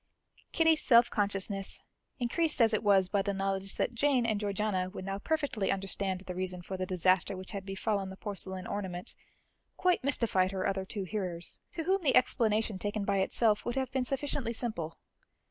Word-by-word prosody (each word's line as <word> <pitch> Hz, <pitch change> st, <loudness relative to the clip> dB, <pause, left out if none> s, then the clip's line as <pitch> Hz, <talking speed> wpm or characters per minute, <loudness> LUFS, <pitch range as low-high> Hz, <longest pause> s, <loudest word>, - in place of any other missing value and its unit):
Kitty's 320 Hz, -2 st, +4 dB
self 235 Hz, -1 st, +6 dB
consciousness, 200 Hz, -1 st, 0 dB, 0.4 s
increased 300 Hz, +6 st, 0 dB
as 225 Hz, -2 st, +5 dB
it 215 Hz, -, +2 dB
was 195 Hz, -3 st, +4 dB
by 200 Hz, +1 st, +1 dB
the 200 Hz, 0 st, -2 dB
knowledge 195 Hz, 0 st, -1 dB
that -, -, 0 dB
Jane 255 Hz, 0 st, +2 dB
and 215 Hz, -3 st, +1 dB
Georgiana 200 Hz, -2 st, -1 dB
would 185 Hz, -1 st, -7 dB
now 195 Hz, 0 st, -3 dB
perfectly 280 Hz, -6 st, 0 dB
understand 195 Hz, -1 st, -2 dB
the 185 Hz, -1 st, -6 dB
reason 180 Hz, -1 st, -3 dB
for 190 Hz, -, -5 dB
the 185 Hz, 0 st, -3 dB
disaster 185 Hz, +1 st, +2 dB
which 185 Hz, 0 st, -7 dB
had 195 Hz, -1 st, -6 dB
befallen 195 Hz, 0 st, -1 dB
the 190 Hz, -, -9 dB
porcelain 190 Hz, -2 st, -3 dB
ornament, 185 Hz, -3 st, -4 dB, 0.6 s
quite 360 Hz, -5 st, +2 dB
mystified 225 Hz, -9 st, +2 dB
her 190 Hz, -1 st, -2 dB
other 190 Hz, -1 st, -1 dB
two 200 Hz, +1 st, -4 dB
hearers, 180 Hz, -3 st, -4 dB
to 330 Hz, -, -3 dB
whom 380 Hz, +3 st, +2 dB
the 280 Hz, -6 st, +3 dB
explanation 220 Hz, -5 st, +2 dB
taken 205 Hz, 0 st, -2 dB
by 200 Hz, -1 st, +1 dB
itself 210 Hz, +2 st, +2 dB
would 240 Hz, -, -3 dB
have 265 Hz, -1 st, -1 dB
been 260 Hz, -1 st, 0 dB
sufficiently 270 Hz, -3 st, -2 dB
simple. 215 Hz, -9 st, -3 dB
200 Hz, 180 wpm, -31 LUFS, 190-235 Hz, 0.6 s, self